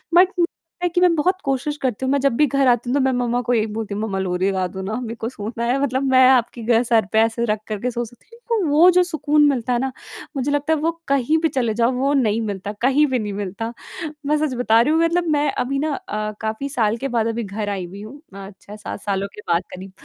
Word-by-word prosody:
But 360 Hz, +1 st, +7 dB
मुझे -, -, +5 dB
लगता 340 Hz, +1 st, -6 dB
है -, -, +2 dB
कि 355 Hz, -, +3 dB
मैं 355 Hz, -2 st, +5 dB
बहुत 370 Hz, +5 st, +1 dB
कोशिश 275 Hz, +2 st, -1 dB
करती 260 Hz, -1 st, -1 dB
हूँ 260 Hz, -, 0 dB
मैं 280 Hz, -, +2 dB
जब 275 Hz, +1 st, +2 dB
भी 300 Hz, -, +4 dB
घर 275 Hz, 0 st, +2 dB
आती 245 Hz, 0 st, +2 dB
हूँ -, -, 0 dB
तो -, -, +3 dB
मैं 265 Hz, -, +2 dB
मम्मा 245 Hz, -1 st, 0 dB
को 245 Hz, +1 st, -1 dB
यही 220 Hz, -2 st, +2 dB
बोलती 220 Hz, -2 st, -4 dB
हूँ, 205 Hz, -, -3 dB
"मम्मा 195 Hz, -3 st, -2 dB
लोरी 185 Hz, +1 st, 0 dB
गा 185 Hz, -1 st, -1 dB
दो 190 Hz, +1 st, -7 dB
ना।" 215 Hz, +5 st, -3 dB
मेरे 230 Hz, -1 st, -5 dB
को 225 Hz, 0 st, -4 dB
सोना 230 Hz, 0 st, -5 dB
है। 250 Hz, +3 st, +1 dB
मतलब 265 Hz, -1 st, 0 dB
मैं 260 Hz, 0 st, +7 dB
आपकी 240 Hz, -2 st, +2 dB
गै 235 Hz, +1 st, +3 dB
सर 225 Hz, -3 st, +2 dB
पे 220 Hz, -, +4 dB
ऐसे 225 Hz, +1 st, +1 dB
रख 215 Hz, -2 st, 0 dB
कर 215 Hz, -2 st, -3 dB
के 250 Hz, 0 st, -1 dB
सो 240 Hz, 0 st, -2 dB
सकती 235 Hz, +1 st, -18 dB
हूँ, 470 Hz, -, -15 dB
क्योंकि 450 Hz, -5 st, +1 dB
तो 300 Hz, -, 0 dB
वो 330 Hz, +5 st, +7 dB
जो 360 Hz, 0 st, +4 dB
सुकून 300 Hz, -3 st, +1 dB
मिलता 250 Hz, -2 st, -1 dB
है 240 Hz, -, +1 dB
ना, 265 Hz, +1 st, -1 dB, 0.4 s
मुझे 275 Hz, +2 st, -1 dB
लगता 290 Hz, +2 st, +1 dB
है 315 Hz, -, 0 dB
वो 325 Hz, +3 st, +1 dB, 0.2 s
कहीं 280 Hz, +3 st, +2 dB
पे 325 Hz, -, +3 dB
चले 245 Hz, -7 st, -1 dB
जाओ, 235 Hz, +3 st, +2 dB
वो 270 Hz, +3 st, 0 dB
नहीं 230 Hz, -5 st, +2 dB
मिलता, 205 Hz, -2 st, -4 dB
कहीं 270 Hz, +4 st, +4 dB
पे 255 Hz, -3 st, 0 dB
नहीं 210 Hz, -2 st, -4 dB
मिलता। 205 Hz, +3 st, -4 dB, 0.5 s
मैं 300 Hz, +1 st, +2 dB
सच 300 Hz, -3 st, -1 dB
बता 230 Hz, -2 st, +3 dB
रही 295 Hz, +6 st, +2 dB
हूँ, 325 Hz, -, +3 dB
मतलब 340 Hz, +1 st, +2 dB
मैं 290 Hz, 0 st, +1 dB
अभी 275 Hz, +2 st, -2 dB
ना 305 Hz, +1 st, -1 dB
अ, 215 Hz, -3 st, -4 dB
काफ़ी 220 Hz, +6 st, -3 dB
साल 225 Hz, -4 st, 0 dB
के 270 Hz, -, -3 dB
बाद 230 Hz, -3 st, 0 dB
अभी 230 Hz, +1 st, -2 dB
घर 205 Hz, +1 st, -4 dB
आई 195 Hz, -3 st, -3 dB
हुई 195 Hz, +3 st, -10 dB
हूँ 265 Hz, +8 st, -10 dB
अ, 195 Hz, 0 st, -8 dB
6-7 210 Hz, 0 st, -8 dB
सालों 200 Hz, -1 st, -2 dB
के 210 Hz, -, -9 dB
बाद 170 Hz, +1 st, +2 dB
करीब, 185 Hz, +1 st, -9 dB
245 Hz, 280 wpm, -21 LUFS, 215-280 Hz, 0.5 s, But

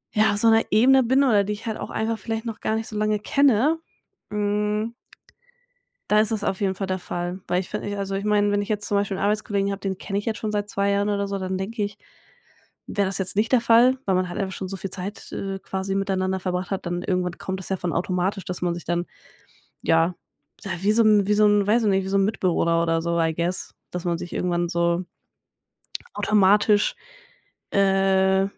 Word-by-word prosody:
ja, 215 Hz, 0 st, +4 dB
auf 205 Hz, -, -1 dB
so 230 Hz, -, +6 dB
'ner 225 Hz, 0 st, +5 dB
Ebene 260 Hz, +5 st, +5 dB
bin 260 Hz, +3 st, +3 dB
oder 210 Hz, -6 st, +4 dB
die 210 Hz, +1 st, -2 dB
ich 210 Hz, -, -9 dB
halt 220 Hz, -1 st, -3 dB
auch -, -, -6 dB
einfach 220 Hz, 0 st, -2 dB
vielleicht 225 Hz, 0 st, -4 dB
noch 225 Hz, -2 st, -5 dB
gar 220 Hz, -, -1 dB
nicht 225 Hz, +1 st, -3 dB
so 215 Hz, -, -7 dB
lange 215 Hz, 0 st, +1 dB
kenne, 280 Hz, +6 st, +3 dB, 0.5 s
hm. 210 Hz, +2 st, -1 dB, 1.2 s
Da 210 Hz, -, +5 dB
ist 215 Hz, +1 st, +2 dB
es 210 Hz, -2 st, -2 dB
auf 190 Hz, -, -1 dB
jeden 190 Hz, -2 st, 0 dB
Fall 195 Hz, 0 st, -4 dB
der 185 Hz, 0 st, -2 dB
Fall. 175 Hz, +1 st, -4 dB
Weil 180 Hz, -, +1 dB
ich 190 Hz, -, -9 dB
fi 210 Hz, -, -2 dB
ich 205 Hz, -1 st, -5 dB
also 195 Hz, -1 st, -3 dB
ich 200 Hz, -, -3 dB
meine, 205 Hz, -1 st, +2 dB
wenn 205 Hz, -, +1 dB
ich 205 Hz, -, -6 dB
jetzt 210 Hz, -1 st, -1 dB
zum 205 Hz, -, +1 dB
Beispiel 200 Hz, -1 st, -1 dB
'n -, -, -5 dB
Arbeitskollegen 205 Hz, -1 st, 0 dB
habe, 200 Hz, -, -4 dB
den 190 Hz, -1 st, -3 dB
kenne 195 Hz, +1 st, -3 dB
ich 205 Hz, -, -8 dB
jetzt 225 Hz, -1 st, -2 dB
schon 215 Hz, -1 st, -3 dB
seit 205 Hz, 0 st, -2 dB
2 200 Hz, 0 st, 0 dB
Jahren 200 Hz, +1 st, +1 dB
oder 200 Hz, -1 st, -1 dB
so, 200 Hz, 0 st, -3 dB
dann 185 Hz, 0 st, -3 dB
denke 210 Hz, +3 st, -3 dB
ich, 205 Hz, 0 st, -5 dB, 0.9 s
wäre 200 Hz, -1 st, 0 dB
das 190 Hz, 0 st, +1 dB
jetzt 190 Hz, 0 st, -1 dB
nicht 220 Hz, +4 st, +1 dB
der 250 Hz, -, +5 dB
Fall, 240 Hz, +3 st, +5 dB
weil 190 Hz, -, +2 dB
man 185 Hz, 0 st, +1 dB
halt 175 Hz, -, -6 dB
einfach 190 Hz, -1 st, -3 dB
schon 190 Hz, -, -5 dB
so 195 Hz, -, -4 dB
viel 190 Hz, 0 st, -5 dB
Zeit, 195 Hz, +2 st, -7 dB
äh, 195 Hz, -1 st, -4 dB
quasi 190 Hz, 0 st, -4 dB
miteinander 190 Hz, -1 st, -1 dB
verbracht 180 Hz, +1 st, -3 dB
hat. 195 Hz, -1 st, -3 dB
Dann 175 Hz, +1 st, -2 dB
irgendwann 180 Hz, -2 st, -1 dB
kommt 190 Hz, 0 st, -5 dB
das -, -, -7 dB
ja 190 Hz, -, 0 dB
von 175 Hz, -1 st, -3 dB
automatisch, 185 Hz, +2 st, -1 dB
dass 180 Hz, -1 st, -5 dB
man 175 Hz, -1 st, 0 dB
sich 175 Hz, -, -8 dB
dann 175 Hz, 0 st, 0 dB, 0.8 s
ja 165 Hz, +2 st, +2 dB, 0.5 s
ja, 195 Hz, -, -5 dB
wie 205 Hz, +2 st, +3 dB
so 230 Hz, +1 st, +4 dB
'n 210 Hz, -2 st, +4 dB
wie 210 Hz, -, +3 dB
so 210 Hz, 0 st, +4 dB
'n, 205 Hz, -1 st, +4 dB
weiß 225 Hz, +3 st, +3 dB
ich 210 Hz, -, +3 dB
nicht 195 Hz, -1 st, +2 dB
wie 190 Hz, -, -5 dB
so 195 Hz, -, +2 dB
'n 195 Hz, -, +3 dB
Mitbewohner 170 Hz, -5 st, +1 dB
oder 165 Hz, -1 st, +1 dB
so, 170 Hz, 0 st, -1 dB
I 160 Hz, 0 st, +1 dB
guess, 170 Hz, +3 st, -2 dB, 0.2 s
dass 180 Hz, -1 st, -4 dB
man 170 Hz, -1 st, 0 dB
sich 175 Hz, -, -7 dB
irgendwann 175 Hz, -1 st, 0 dB
so 170 Hz, +1 st, 0 dB, 1.1 s
automatisch, 205 Hz, -, +3 dB, 0.8 s
äh, 195 Hz, -1 st, +3 dB
200 Hz, 235 wpm, -24 LUFS, 185-210 Hz, 1.2 s, so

